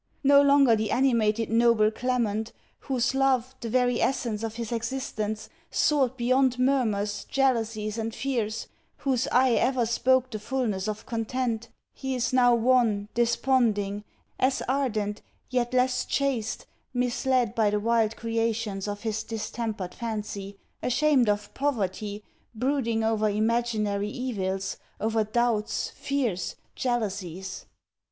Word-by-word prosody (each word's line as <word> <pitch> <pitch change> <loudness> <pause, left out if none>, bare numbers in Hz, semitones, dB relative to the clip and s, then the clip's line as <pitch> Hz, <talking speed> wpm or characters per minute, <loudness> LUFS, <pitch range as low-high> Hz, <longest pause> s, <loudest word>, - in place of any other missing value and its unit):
No 280 +1 +7
longer 280 -4 +5
the 215 -1 -1
animated 230 -4 +2
noble 230 -2 +4
Clement, 230 -2 -1 0.3
whose 250 -2 0
love, 260 -2 +2
the 230 - -4
very 245 0 +2
essence 235 -5 0
of 225 -1 -4
his 235 -1 -5
existence, 220 -3 -3 0.2
soared 265 -4 +2
beyond 255 +1 +2
murmurs, 220 -6 +1
jealousies, 225 -5 0
and 225 0 -2
fears, 230 -5 -2 0.3
whose 260 -3 0
eye 255 0 +4
ever 245 +1 +2
spoke 255 +2 +2
the 215 - -4
fulness 215 -4 -2
of 215 0 -4
content, 235 0 -2 0.2
he 265 -1 -3
is 250 0 -1
now 245 -1 +5
wan, 230 -4 +2
desponding, 230 -4 +1 0.4
as 260 +1 +1
ardent, 220 -6 -1 0.3
yet 245 -1 0
less 255 0 +2
chaste, 260 -5 -1 0.3
misled 250 -1 +1
by 220 -2 +2
the 210 0 0
wild 225 0 +1
creations 225 -3 -2
of 205 0 -4
his 220 -1 -2
distempered 220 -3 -4
fancy, 210 -3 -5 0.2
ashamed 255 -2 +3
of 205 0 -1
poverty, 210 -6 -2 0.3
brooding 235 -2 0
over 220 -1 +2
imaginary 215 -1 0
evils; 195 -6 -3 0.2
over 220 0 +1
doubts, 220 0 0
fears, 245 -10 -2 0.2
jealousies! 195 -7 -3
230 Hz, 125 wpm, -27 LUFS, 215-255 Hz, 0.4 s, No